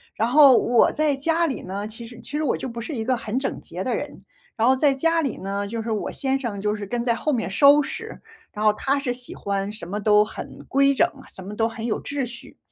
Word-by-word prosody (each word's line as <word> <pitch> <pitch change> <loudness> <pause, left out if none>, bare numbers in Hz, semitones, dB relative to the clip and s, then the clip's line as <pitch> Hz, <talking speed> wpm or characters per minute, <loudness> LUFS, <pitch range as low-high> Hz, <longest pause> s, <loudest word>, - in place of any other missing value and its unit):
然 225 +2 0
后 275 -1 +7
我 240 -1 +4
在 300 -2 +1
家 325 +5 +2
里 270 - -3
呢， 200 +3 -5
其 225 +2 -8
实 235 +1 -12
其 - - -10
实 300 +1 -1
我 285 - +1
就 - - -5
不 235 0 -6
是 305 - -6
一 225 - -2
个 255 +1 +2
很 230 +2 -3
整 - - -3
洁 - - -7
的 - - -1
人。 - - -6 0.4
然 225 +1 +2
后 260 - +5
在 280 +1 +3
家 330 +5 +2
里 275 - -2
呢， 200 +1 -3
就 230 +2 -4
是 225 - -5
我 215 - -2
先 270 -1 -1
生 220 -7 -4
就 210 +1 0
是 210 -1 -6
跟 235 +4 -2
在 235 -1 +2
后 300 +6 -1
面 235 -6 -1
收 280 +9 +6
拾， 280 - -7 0.3
然 210 - -5
后 215 - +6
他 275 +6 0
是 270 -3 -2
喜 245 0 -7
欢 200 0 -2
什 210 -5 -8
么 205 +2 -3
都 210 0 +5
很 215 - -9
规 275 +1 +4
整， 335 - +3 0.2
什 190 - -10
么 200 +3 -7
都 225 +1 +1
很 225 0 -5
有 220 - -1
秩 280 -3 -3
序。 235 0 -12
235 Hz, 285 characters per minute, -23 LUFS, 210-275 Hz, 0.4 s, 后